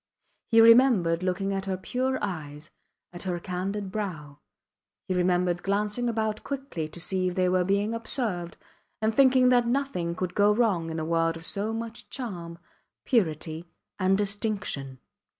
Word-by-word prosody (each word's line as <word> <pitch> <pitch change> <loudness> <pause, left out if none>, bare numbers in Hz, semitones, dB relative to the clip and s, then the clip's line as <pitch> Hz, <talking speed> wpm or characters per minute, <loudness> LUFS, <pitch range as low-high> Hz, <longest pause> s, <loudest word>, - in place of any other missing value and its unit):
He 225 -1 +6
remembered 225 -8 +6
looking 185 +2 -1
at 195 0 -3
her 190 -1 -2
pure 255 +7 -1
eyes, 155 -5 -5 0.4
at 175 - -8
her 180 -2 -2
candid 190 +3 -4
brow; 160 -9 -5 0.7
he 185 - 0
remembered 180 -1 +1
glancing 210 +4 0
about 220 -2 -2
quickly 270 - -4
to 155 - -12
see 185 +1 -1
if 180 - -3
they 185 -1 +2
were 180 0 +2
being 200 +4 0
observed, 220 -7 -2 0.4
and 220 0 +1
thinking 260 0 +5
that 245 -1 +4
nothing 235 -10 -1
could 180 0 -3
go 205 0 +4
wrong 200 -8 +1
in 160 - -4
a 155 - -3
world 165 0 +1
of 165 - -4
so 205 +4 -1
much 225 +1 -6
charm, 175 -10 -6 0.5
purity, 165 - 0 0.3
and 190 0 +3
distinction. 205 - -2
195 Hz, 155 wpm, -27 LUFS, 175-225 Hz, 0.7 s, He